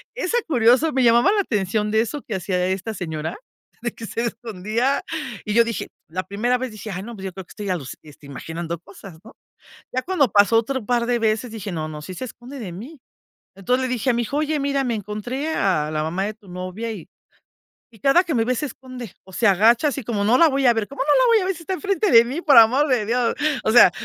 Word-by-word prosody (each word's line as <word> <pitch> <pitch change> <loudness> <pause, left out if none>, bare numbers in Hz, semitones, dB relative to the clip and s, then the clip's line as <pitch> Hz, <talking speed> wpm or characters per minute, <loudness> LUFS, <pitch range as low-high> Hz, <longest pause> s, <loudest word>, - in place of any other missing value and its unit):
es 425 -7 -2
tan 480 - +2
curioso 255 +3 +4
me 265 - +2
llamaba 235 - +5
la 415 - +3
atención 210 - -1
de 220 0 +3
eso 245 +5 -4
que 215 - -5
hacía 180 0 -1
esta 195 +4 -3
señora 160 - -5 0.5
de 235 - -1
que 225 - -8
se 230 - -3
escondía 230 +3 -2 0.4
y 210 - -2
yo 235 +2 +6
dije, 230 -1 -4 0.2
la 185 +3 -3
primera 240 +6 0
vez 255 -2 -4
dije:"Ay 200 -3 -6
no, 235 +2 -8
pues, 195 -2 -8
yo 190 - -5
creo 190 -1 -8
que - - -19
estoy 205 -2 -6
aluci 145 -9 -3
este 150 -1 -15
imaginando 165 +4 -6
cosas 190 -2 -13
¿no?" 225 - -15 0.6
Ya 255 - 0
cuando 345 -6 +2
pasó 205 +3 +5
otro 250 0 -2
par 240 -1 +1
de 245 -1 +1
veces 220 +2 0
dije: 210 -3 -6
"No, 155 -2 -3
no 155 -1 -7
sí 185 - -8
se 220 - -6
esconde 250 +3 -10
de 195 -7 -6
mí". 255 - -10 0.6
Entonces 250 +7 0
le - - -6
dije 245 +2 -1
a - - -1
mi 235 - 0
hijo: 280 +6 -3
"Oye 305 0 0
mira 275 -1 0
me 235 -2 -1
encontré 230 +9 -4
a 155 -6 +1
la 155 0 -1
mamá 175 +5 -2
de 215 - -3
tu 210 -3 -22
novia 185 +6 -5
y 200 -7 -8 0.9
y - - -19
cada 310 +7 +4
que 335 -4 -3
me 225 - +2
ve 255 0 0
se 300 - -2
esconde 255 -5 -10
o 190 - -15
se 235 - 0
agacha 225 - +4
así 275 -1 -4
como 210 -3 -2
no 240 +4 +4
la 330 -2 +6
voy 275 0 0
a 240 - +6
ver". 225 -2 -2
¿Cómo 280 - -6
no 295 +1 +3
la - - +4
voy 460 -2 +5
a - - -3
ver 380 -1 -1
si 335 - -11
está 375 - -3
enfrente 400 +2 0
de 230 0 +8
mí?, 270 +8 -4
por 290 -7 +5
amor 255 +7 +6
de 240 -5 +2
Dios. 235 +1 +1 0.3
O - - +1
sea, 240 -6 +8
230 Hz, 250 wpm, -22 LUFS, 195-260 Hz, 0.9 s, de